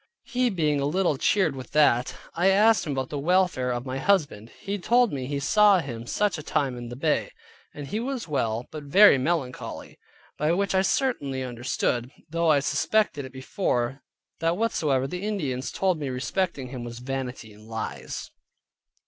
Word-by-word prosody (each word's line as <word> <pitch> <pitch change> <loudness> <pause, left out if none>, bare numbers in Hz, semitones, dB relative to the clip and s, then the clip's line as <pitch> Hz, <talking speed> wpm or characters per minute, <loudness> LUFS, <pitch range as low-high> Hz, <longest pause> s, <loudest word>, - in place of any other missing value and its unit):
He 250 0 0
being 155 -7 +1
a 140 - +1
little 175 0 +1
cheered 165 +1 +2
with 130 +1 -9
that, 135 -5 +3 0.2
I 175 +3 +2
asked 210 0 +4
him 145 - -1
about 130 -1 -2
the 145 - -3
welfare 175 -5 +2
of 120 0 -2
my 130 0 -3
husband. 145 - +1
He 200 +1 -4
told 240 +2 +3
me 130 -2 -3
he 140 0 -2
saw 210 +6 +5
him 120 -6 -6
such 205 -1 0
a - - -5
time 135 -3 -1
in 120 -1 -7
the 120 - -7
Bay, 150 +3 0 0.4
and 145 - -8
he 180 +11 -3
was 255 -2 -3
well, 120 -6 -1
but 155 - -6
very 165 +1 +7
melancholy. 135 -3 -3 0.4
By 150 +2 +2
which 200 +2 0
I 190 - +4
certainly 145 - 0
understood 120 0 -2 0.2
(though 165 +1 0
I 145 -2 +4
suspected 175 -2 +1
it 130 - -10
before) 130 -1 -2 0.4
that 165 +2 +1
whatsoever 150 - +1
the 180 +6 -5
Indians 145 -12 -2
told 185 -4 0
me 145 -3 -3
respecting 135 +1 -2
him 125 -2 -6
was 120 -1 -7
vanity 125 -3 -5
and 105 +1 -16
lies. 110 0 -5
145 Hz, 180 wpm, -26 LUFS, 130-190 Hz, 0.4 s, very